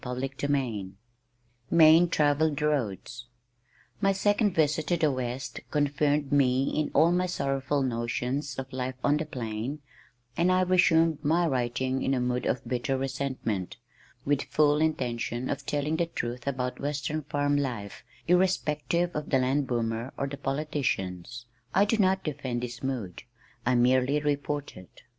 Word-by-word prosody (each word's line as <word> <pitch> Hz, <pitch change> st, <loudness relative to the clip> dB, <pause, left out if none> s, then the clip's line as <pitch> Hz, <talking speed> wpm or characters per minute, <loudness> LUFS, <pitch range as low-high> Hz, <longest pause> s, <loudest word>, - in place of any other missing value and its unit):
CHAPTER 125 Hz, +1 st, -2 dB, 0.2 s
XXXI 115 Hz, -9 st, -1 dB, 0.8 s
Main 165 Hz, +1 st, +6 dB
Travelled 150 Hz, -1 st, +2 dB
Roads 120 Hz, -5 st, -2 dB, 0.7 s
My 195 Hz, -1 st, +4 dB
second 205 Hz, 0 st, +1 dB
visit 155 Hz, 0 st, +1 dB
to 175 Hz, -, +2 dB
the 155 Hz, -3 st, +2 dB
West 130 Hz, 0 st, -4 dB
confirmed 145 Hz, 0 st, +1 dB
me 135 Hz, -2 st, +3 dB
in 155 Hz, -1 st, 0 dB
all 165 Hz, +2 st, +5 dB
my 180 Hz, +1 st, +1 dB
sorrowful 140 Hz, -3 st, -1 dB
notions 125 Hz, +3 st, -2 dB
of 135 Hz, -1 st, -6 dB
life 130 Hz, 0 st, -3 dB
on 145 Hz, +1 st, +3 dB
the 155 Hz, 0 st, -3 dB
plain, 120 Hz, 0 st, -4 dB, 0.6 s
and 175 Hz, +3 st, +2 dB
I 185 Hz, 0 st, +3 dB
resumed 165 Hz, -4 st, +3 dB
my 165 Hz, +4 st, +3 dB
writing 130 Hz, -1 st, -1 dB
in 135 Hz, -, +1 dB
a -, -, 0 dB
mood 125 Hz, 0 st, -1 dB
of 130 Hz, -, -2 dB
bitter 130 Hz, +2 st, -1 dB
resentment, 130 Hz, -8 st, -3 dB, 0.5 s
with 145 Hz, 0 st, +2 dB
full 150 Hz, 0 st, +3 dB
intention 125 Hz, -5 st, -1 dB
of -, -, -5 dB
telling 150 Hz, +2 st, 0 dB
the 170 Hz, 0 st, +1 dB
truth 120 Hz, -5 st, -5 dB
about 125 Hz, -2 st, -2 dB
western 145 Hz, +1 st, -2 dB
farm 145 Hz, 0 st, 0 dB
life, 120 Hz, -8 st, -3 dB, 0.2 s
irrespective 175 Hz, -1 st, +1 dB
of 150 Hz, -1 st, -3 dB
the 135 Hz, -, +3 dB
land 130 Hz, +2 st, +1 dB
boomer 115 Hz, +1 st, -2 dB
or -, -, -1 dB
the 140 Hz, +1 st, -5 dB
politicians. 125 Hz, -, -3 dB, 0.3 s
I 200 Hz, -, +5 dB
do 220 Hz, +2 st, +1 dB
not 190 Hz, -2 st, +2 dB
defend 130 Hz, -5 st, -3 dB
this 120 Hz, -1 st, -6 dB
mood, 120 Hz, -10 st, -4 dB, 0.5 s
I 130 Hz, -, +3 dB
merely 130 Hz, +3 st, +3 dB
report 145 Hz, 0 st, -2 dB
it. 90 Hz, -, -15 dB
140 Hz, 150 wpm, -28 LUFS, 125-155 Hz, 0.8 s, Main